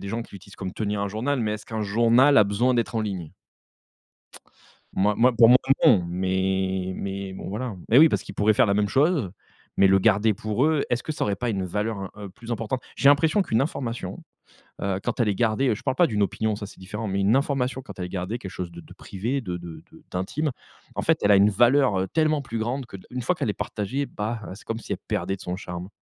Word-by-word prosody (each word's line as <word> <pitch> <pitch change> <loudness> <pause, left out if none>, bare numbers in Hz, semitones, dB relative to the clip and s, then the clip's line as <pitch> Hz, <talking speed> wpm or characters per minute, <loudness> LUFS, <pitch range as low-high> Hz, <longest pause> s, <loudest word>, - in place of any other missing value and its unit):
des 100 - -6
gens 115 +3 -3
qui 115 - -15
l'utilisent 100 +1 -13
comme 95 -2 -5
tenir 105 -1 -2
un 100 - -1
journal- 125 +8 -1
mais 105 -2 0
est-ce 110 0 -7
qu'un 110 -2 -3
journal 120 +7 +4
a - - +8
besoin 105 +6 +1
d'être 120 0 -1
en - - +1
ligne? 90 -7 -5 1.6
Moi 105 +2 +2
moi 125 +2 +4
pour 115 -1 +8
moi 125 - +8 0.3
non, 95 -7 +6
mais 95 +1 -1
mais 100 -1 -5
bon, - - -7
voilà, 110 +6 -3
hein. 100 -6 -7
Mais 115 - +5
oui, 160 - +8
parce - - -1
qu'ils - - -9
pourraient 105 +1 +3
faire - - +4
la 100 - +1
même 105 0 +1
chose 140 - +2 0.5
mais 100 - +6
le 95 0 +5
garder 105 +1 +3
pour 110 +8 -1
eux. 155 -2 +2
Est-ce 120 0 0
que 155 - -4
ça - - -2
aurait 100 -1 -1
pas 125 - -2
une 100 -4 -1
valeur, 100 +1 -3
heu, 105 -1 -7
plus 115 +5 -10
importante? 115 +3 -2 0.2
J'ai 140 - +4
l'impression 155 +7 +4
qu'une 115 -10 +1
information, 125 -5 -4 0.6
heu, 95 -1 0
quand 120 +1 -3
elle 115 - +3
est - - -1
gardée, 115 +5 +1
heu- - - +2
je - - -10
parle - - 0
pas 175 - +5
d'une 105 -7 0
opinion 110 +3 0
ça 105 -1 -6
c'est - - -15
différent- 105 +4 -5
mais 100 0 -1
une 100 +3 +3
information, 135 -2 0
quand 125 - -11
elle 90 - -3
est - - -9
gardée, 95 +5 -3
quelque 95 -6 -8
chose 90 -2 -6
de 85 - -9
de - - -15
privé, 115 +8 -3
de 90 -8 -4
de 85 -2 -9
de - - -17
d'intime, 140 +12 -2 0.5
en - - -1
fait - - +2
elle 100 - +3
a 100 - +7
une 100 +2 +5
valeur, 120 0 +4
heu, 95 - -2
tellement 155 -2 +1
plus 115 -4 -5
grande 125 +5 -2
que 100 - -9
de - - -17
une 125 0 -4
fois - - +1
qu'elle - - -3
est - - +1
partagée 115 +7 -3
bah 110 0 -4
heu, - - -7
c'est 105 - -14
comme 115 - -3
si - - -6
elle - - -3
perdait 95 - -1
de - - -21
son 90 -1 -4
charme. 90 -1 -7
105 Hz, 260 wpm, -25 LUFS, 95-125 Hz, 1.6 s, a